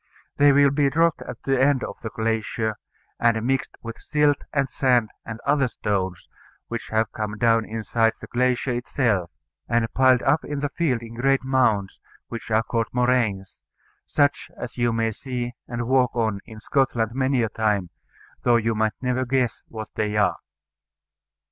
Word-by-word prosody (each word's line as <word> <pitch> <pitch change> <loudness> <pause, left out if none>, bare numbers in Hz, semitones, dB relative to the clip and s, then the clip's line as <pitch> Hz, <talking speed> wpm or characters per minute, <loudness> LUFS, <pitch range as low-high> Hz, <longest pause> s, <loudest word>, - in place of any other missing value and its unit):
They 145 0 +6
will 140 0 +5
be 140 0 +2
dropped 165 +3 +2
at - - -8
the 135 -1 +1
end 135 -1 +3
of - - -5
the 110 - -4
glacier, 110 0 -2 0.4
and 115 -1 +3
mixed 135 +1 -1
with 115 -1 -7
silt 150 -1 +2
and 140 -2 +1
sand 125 -4 +2 0.2
and 110 0 -6
other 140 -1 +3
stones 95 -6 -3 0.4
which 115 -1 -4
have 110 0 0
come 105 -1 -4
down 115 0 +3
inside 115 +1 0
the - - -8
glacier 125 +1 0
itself, 120 -7 0 0.4
and 115 0 +1
piled 130 -1 +4
up 145 +4 +2
in 145 -1 -4
the 145 - -1
field 135 -7 -1
in 115 0 -9
great 135 +3 +1
mounds, 115 -7 +1 0.3
which 115 -1 -7
are 110 +1 +3
called 115 -1 -1
moraines, 120 -6 0 0.5
such 145 -1 +1
as - - -6
you 120 -1 +1
may 115 0 0
see 120 +1 -4
and 120 -1 -4
walk 130 -2 +2
on 110 -4 0
in 110 -2 -10
Scotland 115 -3 0
many 130 -1 +1
a 110 - 0
time, 105 -6 0 0.5
though 120 - +4
you 115 0 0
might 110 -1 +1
never 125 0 +1
guess 130 -1 0
what 110 -1 -7
they 105 0 -1
are. 105 - +2
120 Hz, 170 wpm, -24 LUFS, 110-130 Hz, 0.5 s, They